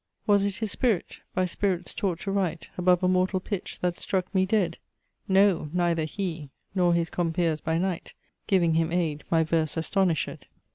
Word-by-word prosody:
Was 205 -1 +4
it 200 -1 -1
his 220 -2 -2
spirit, 230 -8 0 0.2
by 185 0 +2
spirits 180 -1 -1
taught 180 -4 -2
to 200 - -3
write 180 -5 -1
Above 180 0 +3
a - - +4
mortal 185 +1 +2
pitch 195 0 -5
that 175 -1 -1
struck 185 0 -2
me 190 -1 +2
dead? 185 -5 +1 0.5
No, 190 -5 +3
neither 170 -3 +1
he, 165 -4 -4 0.2
nor 175 -3 +3
his 170 -1 0
compeers 165 -2 0
by 160 0 0
night 180 -1 -3 0.3
Giving 175 -4 +3
him 165 0 +1
aid, 165 -4 -1
my 165 -1 +3
verse 160 0 0
astonished. 170 -1 0
180 Hz, 175 wpm, -27 LUFS, 165-190 Hz, 0.5 s, Was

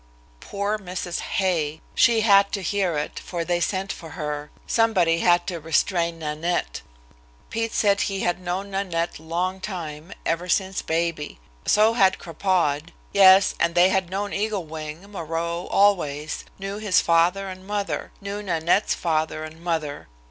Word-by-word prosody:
Poor 200 - -2
Mrs. 180 -2 -4
Hay! 160 -5 -1
She 230 -3 +4
had 200 -2 +5
to 195 - -2
hear 185 -3 0
it, 150 - -3
for 170 -2 -4
they 175 0 +1
sent 190 +3 -1
for 165 -3 -10
her; 150 -2 -4 0.2
somebody 185 -8 +3
had 175 0 +3
to 175 -3 -4
restrain 170 +2 0
Nanette. 155 - -2 0.7
Pete 225 0 -1
said 200 -2 +3
he 195 0 -1
had 175 +1 0
known 185 +3 -3
Nanette 175 -5 -2
long 175 +4 -2
time, 170 -4 -6
ever 170 +2 -1
since 190 +1 +1
baby. 160 - -2 0.3
So 215 +2 +5
had 190 -5 +4
Crapaud. 165 -2 -1 0.2
Yes, 195 -1 +7
and 170 0 +1
they 175 +1 +6
had 190 -2 0
known 200 +2 -3
Eagle 205 -3 -1
Wing, 155 +3 -7
Moreau, 170 -1 -3
always 155 -7 +1
knew 195 +1 -5
his 205 -4 +3
father 175 +4 +2
and 185 0 -9
mother. 205 -1 -3
Knew 200 +1 -5
Nanette's 175 +1 +1
father 155 -2 -1
and 155 +1 -9
mother. 160 -4 -3
180 Hz, 150 wpm, -24 LUFS, 165-195 Hz, 0.7 s, Yes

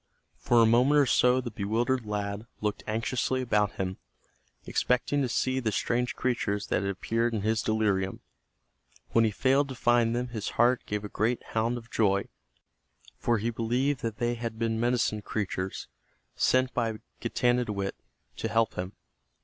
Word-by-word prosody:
For 115 - +4
a - - +6
moment 125 +6 +4
or 145 - +5
so 125 0 +4
the 120 -2 -6
bewildered 115 +4 -1
lad 105 +1 -3
looked 105 0 -2
anxiously 115 +4 0
about 105 -5 +1
him, 95 0 -3 0.7
expecting 130 +3 +1
to 130 - 0
see 130 +2 0
the 115 -4 -1
strange 120 +4 0
creatures 105 -5 -1
that - - +1
had 100 - -1
appeared 115 +4 -1
in 105 - -1
his 110 +1 +1
delirium. 105 -4 0 0.9
When 115 0 +4
he - - +3
failed 135 +6 +2
to 130 - -6
find 120 -1 +3
them 125 +1 -2
his 110 -4 -4
heart 125 +1 +4
gave 105 0 -2
a - - -3
great 115 +4 -1
hound 115 +2 +1
of 115 -1 -11
joy, 100 -2 +1 0.9
for 120 -1 +2
he 115 +3 -1
believed 125 +4 0
that 115 -1 -3
they 120 0 0
had 115 -1 -5
been 115 -1 -1
medicine 120 -3 +1
creatures 95 -3 -3 0.5
sent 130 0 +2
by 115 -2 0 0.2
Getanittowit 115 -6 0 0.4
to - - -2
help 115 -1 +1
him. 90 +2 -5
115 Hz, 165 wpm, -28 LUFS, 105-125 Hz, 0.9 s, a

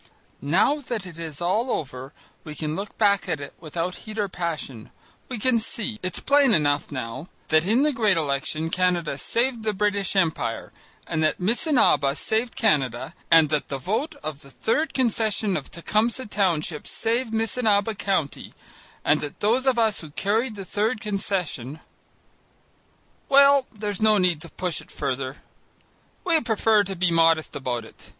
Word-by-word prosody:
Now 190 - +2
that 235 -7 -4
it 170 -2 -10
is 160 -2 -6
all 210 +9 +1
over, 130 - -4 0.3
we 150 -1 -8
can 155 +1 -3
look 200 +3 -6
back 200 -3 +2
at 160 -4 -1
it 145 - -8
without 170 +3 -4
heat 215 0 -9
or 205 -2 0
passion. 160 - -5 0.4
We 250 - -4
can 235 +2 +2
see, 220 0 -3
it's 185 -1 -3
plain 280 -4 +4
enough 145 -1 +1
now, 130 +4 -5 0.2
that 155 +2 +3
in 235 +7 +3
the 300 -1 +2
great 215 -7 +2
election 155 +2 -2
Canada 180 -4 +1
saved 235 - 0
the 215 -1 -1
British 200 -1 0
Empire, 160 -11 0 0.3
and 160 -1 -2
that 155 - +1
Missinaba 210 - +3
saved 220 - -1
Canada 135 - +1 0.2
and 165 -2 +6
that 150 -1 0
the 140 - -3
vote 220 - -2
of 155 -2 -5
the 140 - -14
Third 280 - -1
Concession 220 -5 +1
of 145 - -4
Tecumseh 220 +8 0
Township 175 -7 -1
saved 230 +1 -1
Missinaba 225 -1 +1
County, 195 -9 -2 0.5
and 150 +1 +3
that 150 -1 -7
those 240 +6 +1
of 260 -2 +3
us 220 -3 +2
who 160 - -9
carried 215 - -1
the 195 -2 -7
third 215 +5 -1
concession, 190 - -3 1.5
well, 280 -1 +6
there's 210 -3 -4
no 215 -1 +5
need 180 -5 +1
to 170 - -10
push 180 0 -3
it - - -18
further. 130 +1 -3 0.9
We 330 -3 +4
prefer 220 -3 +3
to 195 0 -4
be 180 -1 +1
modest 165 -1 +3
about 125 -3 -3
it. - - -16
190 Hz, 165 wpm, -24 LUFS, 155-225 Hz, 1.5 s, and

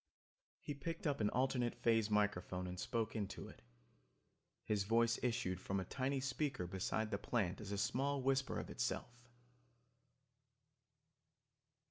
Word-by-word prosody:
He 145 - -4
picked 165 +5 -4
up 145 -5 +1
an 105 - +3
alternate 125 -1 +1
phase 115 -2 +3
microphone 100 -3 +1
and 90 0 -5
spoke 115 +1 -1
into 100 -3 -3
it. - - -13 1.0
His 105 -2 +1
voice 115 +2 +3
issued 95 -7 0
from 95 +1 -1
a 95 - -3
tiny 135 +1 0
speaker 135 - -1
beside 95 +4 -1
the 100 - 0
plant 105 -5 0
as 100 -1 -6
a 100 - -1
small 135 +6 +1
whisper 135 +1 +1
of - - -5
itself. - - -1
115 Hz, 135 wpm, -39 LUFS, 100-130 Hz, 1.0 s, an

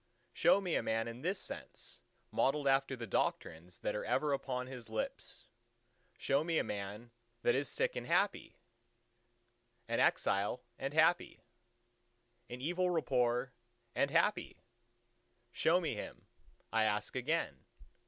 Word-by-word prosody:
Show - - +5
me 180 -4 -2
a - - +2
man 115 +1 0
in 115 +2 -7
this 185 +5 -1
sense - - -8 0.3
modelled 140 +1 +2
after 135 0 +3
the 120 -2 -6
doctrines 85 -3 -2
that - - -1
are 105 - -3
ever 150 -2 +1
upon 125 -2 -2
his 125 -3 -8
lips. 110 -1 -4 0.7
Show 140 +2 +2
me 165 0 0
a - - +3
man 105 +4 -5 0.3
that 120 - +4
is 140 -1 0
sick—and - - -1
happy; - - +1 1.3
an - - 0
exile—and 120 +7 0
happy; 160 +2 +3 1.1
in 125 +1 -7
evil 180 +5 +1
report—and 125 -4 -1
happy! 170 +7 +1 0.9
Show 170 +7 +3
me 170 - -1
him, - - -7 0.5
I 110 -1 +4
ask 105 +2 -1
again. 130 - -1
125 Hz, 125 wpm, -35 LUFS, 115-155 Hz, 1.3 s, Show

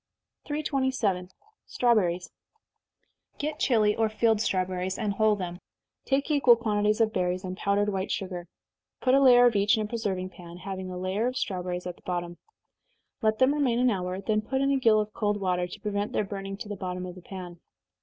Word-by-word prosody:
327. 260 -11 -1 0.4
Strawberries. 180 -8 +1 1.0
Procure 300 +1 -3
Chili 215 -5 +3
or 225 -1 +1
field 215 0 +2
strawberries, 185 -2 -1
and 210 -3 -1
hull 215 +1 +3
them. 180 -3 -5 0.5
Take 275 +3 0
equal 270 -5 +6
quantities 215 -2 +1
of 225 -1 +2
berries, 180 0 -1
and 185 -1 -4
powdered 200 +2 +1
white 190 -1 -2
sugar 180 -2 -4 0.5
put 255 - +3
a 275 - +6
layer 245 -2 +7
of 240 -3 +4
each 205 +2 +3
in 215 - 0
a - - -3
preserving 195 -5 -3
pan, 175 -1 -11
having 190 +1 -6
a 180 - -6
layer 190 +5 -1
of 255 +1 -3
strawberries 180 -1 -3
at 180 - -5
the - - -22
bottom. 175 -1 -4 0.8
Let 215 -1 +2
them 260 +3 +4
remain 270 -6 +1
an 250 0 +3
hour, 185 -2 -2
then 215 +2 0
put 265 +5 -2
in 275 +1 +2
a 275 - +2
gill 225 -4 +5
of 210 0 -3
cold 205 -1 0
water, 180 -2 0
to - - -10
prevent 205 0 -2
their - - +1
burning 195 0 -6
to 210 - -7
the 205 - -4
bottom 180 -1 -4
of 180 - -7
the 185 - -12
pan. 175 -2 -9
205 Hz, 195 wpm, -27 LUFS, 185-230 Hz, 1.0 s, layer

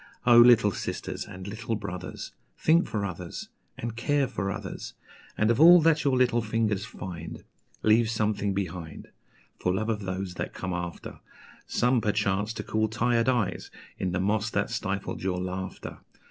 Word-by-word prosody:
Oh, 120 -1 +8
little 120 -3 +7
sisters - - -4
and 95 +1 -9
little 115 +2 -3
brothers, 90 -3 -6 0.3
Think 165 +3 +3
for 105 -2 -2
others, 90 -2 -6 0.3
and 115 -1 -5
care 140 +3 +1
for 95 -3 -3
others! 100 - -6 0.4
And 105 +2 +3
of 120 - +1
all 175 +2 +10
that 160 0 +3
your 135 -3 +2
little 120 -2 +3
fingers 110 -2 0
find, 85 -6 -8 0.4
Leave 110 +1 +4
something 105 -3 0
behind, 90 -5 -5 0.5
For 90 - +1
love 110 +4 -1
of 110 -2 0
those 95 -1 -4
that - - -4
come 95 -1 -4
after: 90 -1 -6 0.5
Some, 125 0 +2
perchance, 105 -1 0
to 110 -2 -5
cool 110 +1 0
tired 115 +2 +1
eyes 120 -6 -1 0.3
in 95 - -1
the 90 - -1
moss 105 +3 +1
that 105 0 -1
stifled 100 -3 -3
your 95 -1 -1
laughter! 95 +1 -5
105 Hz, 160 wpm, -27 LUFS, 95-115 Hz, 0.5 s, all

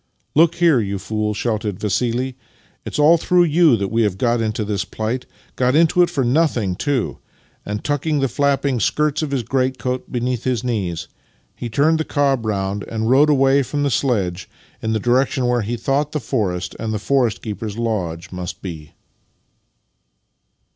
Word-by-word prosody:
" - - -48
Look 165 +2 +5
here, 170 -7 +4
you 100 -2 -2
fool," 105 +2 -2
shouted 105 -4 -2
Vassili. 120 +5 -1 0.2
" - - -35
It's - - -4
all 155 +3 +6
through 180 +2 +3
you 160 -5 +4
that 100 -1 -2
we 115 +1 +1
have 105 -4 +1
got 120 +1 +1
into 110 -1 -1
this 100 -2 -1
plight 110 +5 -4
— - - -32
got 125 +1 +2
into 165 +2 +4
it 175 - +4
for 150 -6 -1
nothing, 120 - +1
too," 140 +3 -1 0.5
and, 105 +1 -4
tucking 145 +1 0
the 135 - +2
flapping 140 0 +1
skirts 150 +7 +1
of 155 - -2
his 135 -3 -1
greatcoat 130 0 -2
beneath 125 -1 -2
his 125 -4 -1
knees, 95 -9 -2 0.5
he 120 - -5
turned 155 +7 +2
the - - +1
cob 135 -7 0
round, 100 -1 -1
and 110 +1 -1
rode 145 +3 +5
away 135 -1 +4
from 145 +2 -2
the 140 - +1
sledge 100 -9 -1 0.3
in 110 0 -1
the 110 - +1
direction 125 +3 +1
where 120 -1 +2
he 115 +3 -3
thought 140 +5 -1
the 150 - 0
forest 95 -8 -2
and 110 -1 -3
the 110 - -1
forest 125 +1 0
keeper's 105 -1 -5
lodge 95 -8 -3
must 90 +1 -6
be. 80 -5 -8
120 Hz, 180 wpm, -20 LUFS, 105-140 Hz, 0.5 s, all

